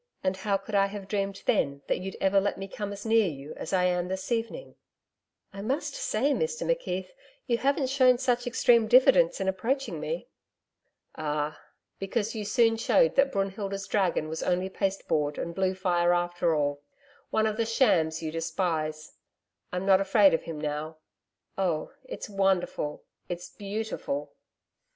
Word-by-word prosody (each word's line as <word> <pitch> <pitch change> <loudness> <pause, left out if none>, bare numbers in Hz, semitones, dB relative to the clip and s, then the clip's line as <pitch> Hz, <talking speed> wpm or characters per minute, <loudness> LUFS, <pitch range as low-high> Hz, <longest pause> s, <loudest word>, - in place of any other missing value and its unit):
And 190 0 +1
how 195 +1 0
could 195 +2 -11
I 200 -1 +4
have 200 -1 -8
dreamed 195 -1 -2
then 140 -1 +1
that - - 0
you'd 190 +1 -6
ever 195 0 +3
let 200 - -1
me 195 0 -5
come 205 -1 -5
as 200 +2 -8
near 225 -2 +4
you 145 -2 -6
as - - -7
I 185 -2 +2
am 180 -1 +1
this 190 +2 -4
evening!' 235 - -2 0.8
'I 195 - -7
must 275 +6 -2
say, 265 +7 0
Mr 475 - -1
McKeith, - - -2 0.3
you 235 -2 0
haven't 275 -1 +1
shown 255 -2 +5
such 245 -1 0
extreme 235 -1 +4
diffidence 485 - +5
in - - -2
approaching 240 +9 -1
me.' - - -4 0.9
'Ah! 150 0 -3 0.4
Because 205 +3 -2
you 215 -2 -4
soon 225 +1 +3
showed - - +3
that 275 0 +3
Brunhilda's 195 -1 -2
dragon 185 -6 +1
was 160 +1 -4
only 180 +1 0
pasteboard 190 -7 -1
and 170 - -4
blue 190 +1 0
fire 175 -2 +2
after 175 -1 +1
all 145 -1 0 0.5
one 220 - +2
of 215 -1 -1
the 230 - +1
shams 165 -10 +2
you 155 - -2
despise. 160 -2 -2 0.6
I'm 180 +1 -3
not 195 -1 +5
afraid 195 -1 +5
of 165 - 0
him 160 -2 -5
now.... 150 +1 -4 0.6
Oh, 170 -5 0
it's - - -6
wonderful.... 190 -7 0 0.3
It's 175 0 -5
beautiful....' 220 +7 -4
195 Hz, 165 wpm, -28 LUFS, 175-225 Hz, 0.9 s, shown